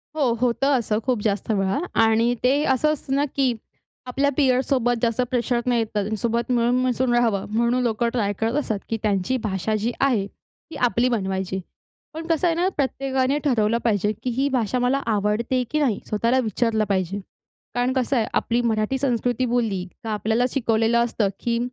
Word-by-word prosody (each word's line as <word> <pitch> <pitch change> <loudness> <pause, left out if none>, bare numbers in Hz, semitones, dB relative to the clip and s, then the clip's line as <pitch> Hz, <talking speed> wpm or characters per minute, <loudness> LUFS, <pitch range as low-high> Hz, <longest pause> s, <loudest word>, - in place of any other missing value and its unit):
हो, 280 -6 +2
होतं 250 +3 +2
असं, 215 -2 -1
खूप 255 -4 +1
जास्त 205 0 -1
वेळा. 195 +3 0 0.2
आणि 225 +2 +3
ते 275 +4 +3
असं 305 +4 +2
असतं 270 -2 -3
ना 285 +1 +2
की 265 -3 +2 0.5
आपल्या 275 +3 +1
पिअरसोबत 255 -3 +2
जास्त 235 +1 +1
प्रेशर 245 -1 +1
नाही 245 -2 +2
येत. 225 - 0
त्यांच्यासोबत 220 +3 -1
मिळून 240 0 +2
मिसळून 250 0 +1
राहावं 230 -5 +2
म्हणून 235 +3 +1
लोकं 235 0 0
ट्राय 205 -5 0
करत 225 +1 0
असतात, 220 -8 -2
की 225 - -1
त्यांची 205 +4 +1
भाषा 210 +1 -1
जी 235 - +1
आहे 245 -8 +2
ती 320 +9 -18
आपली 240 +1 +1
बनवायची. 190 -4 -2 0.5
पण 320 +1 -6
कसं 335 +1 +2
आहे 335 - +1
ना, 350 +2 +1
प्रत्येकाने 270 0 0
ठरवलं 230 -5 +2
पाहिजे, 210 -3 +1
की 255 - -1
ही 265 +4 0
भाषा 250 0 0
मला 250 +3 +1
आवडते 220 +4 0
की 305 - +1
नाही. 250 -9 +1
स्वतःला 230 +4 +1
विचारलं 220 0 0
पाहिजे. 190 0 -1 0.6
कारण 245 +1 +1
कसं 260 +1 0
आहे 225 - +2
आपली 235 +1 +1
मराठी 225 +2 0
संस्कृती 250 -2 0
बोलली 225 -7 0 0.2
का 225 - -5
आपल्याला 220 +3 +1
शिकवलेलं 230 -2 +2
असतं 230 -3 0
की 235 -1 -1
235 Hz, 175 wpm, -23 LUFS, 220-255 Hz, 0.6 s, आणि